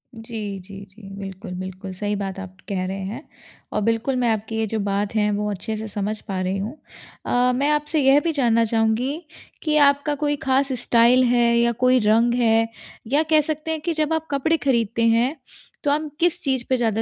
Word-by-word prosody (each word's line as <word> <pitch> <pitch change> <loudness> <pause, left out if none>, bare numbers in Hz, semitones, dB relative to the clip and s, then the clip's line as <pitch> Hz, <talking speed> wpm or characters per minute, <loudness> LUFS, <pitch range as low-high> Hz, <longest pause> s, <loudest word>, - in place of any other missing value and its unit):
जी, 220 -3 -6
जी, 195 +1 -11
जी, 195 0 -14
बिल्कुल, 195 0 -8
बिल्कुल 190 +1 -7
सही 205 +2 -2
बात 195 -1 -4
आप 185 -1 -9
कह 185 -2 -1
रहे 195 - -4
हैं। 220 +10 -6 0.5
अ, - - +1
बिल्कुल 230 +5 0
मैं 245 -2 +1
आपकी 220 +1 -5
ये 225 - +1
जो 220 +1 -2
बात 200 +1 -1
है, 210 -1 +2
वो 210 0 -1
अच्छे 205 +3 -4
से 220 +1 -5
समझ 210 +1 -3
पा 195 -2 -3
रही 185 +1 -1
हूँ। 210 +7 -4 0.5
अ, 250 +1 +2
मैं 280 +3 +1
आपसे 300 +1 +1
यह 270 +1 +6
भी 330 +2 -1
जानना 235 -5 +3
चाहूँगी 225 +3 +1 0.5
कि 305 -1 +1
आपका 285 +1 -1
कोई 290 0 +1
खास 270 +1 +2
स्टाइल 240 +2 +5
है 235 -1 +3
या 235 0 +3
कोई 255 0 +5
रंग 225 +3 +3
है 225 -2 +3 0.5
या 300 +2 +4
कह 310 -1 +5
सकते 310 +1 -4
हैं 315 -1 -3
कि 335 +1 -1
जब 310 0 0
आप 320 0 -2
कपड़े 320 +4 +1
खरीदते 235 -5 +1
हैं, 235 +6 +2 0.5
तो 285 - +2
आप 305 +1 -1
किस 350 0 +2
चीज़ 260 -3 0
पे 260 - +3
ज़्यादा 225 -2 0
230 Hz, 210 wpm, -22 LUFS, 210-275 Hz, 0.5 s, यह